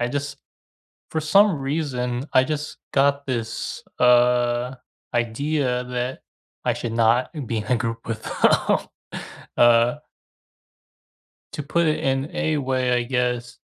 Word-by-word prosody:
I 120 Hz, -, 0 dB
just 145 Hz, +2 st, -4 dB, 0.7 s
for 160 Hz, -, -1 dB
some 195 Hz, +2 st, +4 dB
reason, 135 Hz, -3 st, -2 dB
I 130 Hz, -, +6 dB
just 150 Hz, +1 st, -4 dB
got 140 Hz, 0 st, +2 dB
this, 115 Hz, -3 st, -3 dB, 0.2 s
uh, 125 Hz, 0 st, +3 dB, 0.4 s
idea 125 Hz, +2 st, 0 dB
that 125 Hz, +1 st, -4 dB, 0.4 s
I -, -, +2 dB
should 115 Hz, -, -4 dB
not 115 Hz, +2 st, +3 dB, 0.2 s
be 115 Hz, 0 st, -2 dB
in 105 Hz, -, -4 dB
a 125 Hz, -, +2 dB
group 115 Hz, -1 st, -4 dB
with 115 Hz, -1 st, -4 dB
them. -, -, +2 dB, 0.8 s
Uh 120 Hz, +1 st, +5 dB, 1.6 s
To 150 Hz, -, -4 dB
put 165 Hz, +3 st, +1 dB
it 155 Hz, -, +1 dB
in 135 Hz, +4 st, 0 dB
a 160 Hz, -3 st, 0 dB
way, 130 Hz, -2 st, 0 dB
I 120 Hz, 0 st, +2 dB
guess, 125 Hz, -1 st, -2 dB
125 Hz, 130 wpm, -23 LUFS, 120-145 Hz, 1.6 s, I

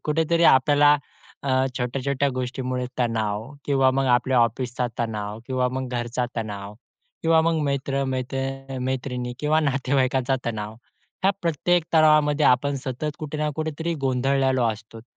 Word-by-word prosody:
कुठेतरी 165 Hz, +2 st, +1 dB
आपल्याला 145 Hz, +2 st, +5 dB, 0.5 s
अ, 140 Hz, -, -4 dB, 0.3 s
छोट्या-छोट्या 135 Hz, +3 st, -1 dB
गोष्टींमुळे 125 Hz, 0 st, -3 dB
तणाव 110 Hz, -2 st, -1 dB, 0.2 s
किंवा 135 Hz, -2 st, +3 dB
मग 135 Hz, 0 st, 0 dB
आपल्या 125 Hz, 0 st, +1 dB
ऑफिसचा 120 Hz, +2 st, 0 dB
तणाव 105 Hz, -2 st, -3 dB
किंवा 130 Hz, -1 st, 0 dB
मग 130 Hz, -1 st, -3 dB
घरचा 120 Hz, +1 st, -2 dB
तणाव 105 Hz, -2 st, -5 dB, 0.5 s
किंवा 165 Hz, 0 st, +4 dB
मग 165 Hz, 0 st, +1 dB
मित्र 140 Hz, 0 st, -1 dB
मैत्र 135 Hz, +1 st, -4 dB
मैत्रिणी 125 Hz, -1 st, -3 dB
किंवा 150 Hz, +1 st, +2 dB
नातेवाईकांचा 135 Hz, -2 st, +1 dB
तणाव, 110 Hz, -2 st, -4 dB, 0.5 s
ह्या 195 Hz, -, +5 dB
प्रत्येक 170 Hz, +1 st, +1 dB
तणावामध्ये 155 Hz, -2 st, +4 dB
आपण 140 Hz, +3 st, +3 dB
सतत 135 Hz, +4 st, -3 dB
कुठे 155 Hz, -1 st, -5 dB
ना 150 Hz, 0 st, 0 dB
कुठेतरी 160 Hz, +2 st, -2 dB
गोंधळलेलो 130 Hz, 0 st, +1 dB
असतो. 110 Hz, +1 st, -7 dB
130 Hz, 130 wpm, -24 LUFS, 125-145 Hz, 0.5 s, आपल्याला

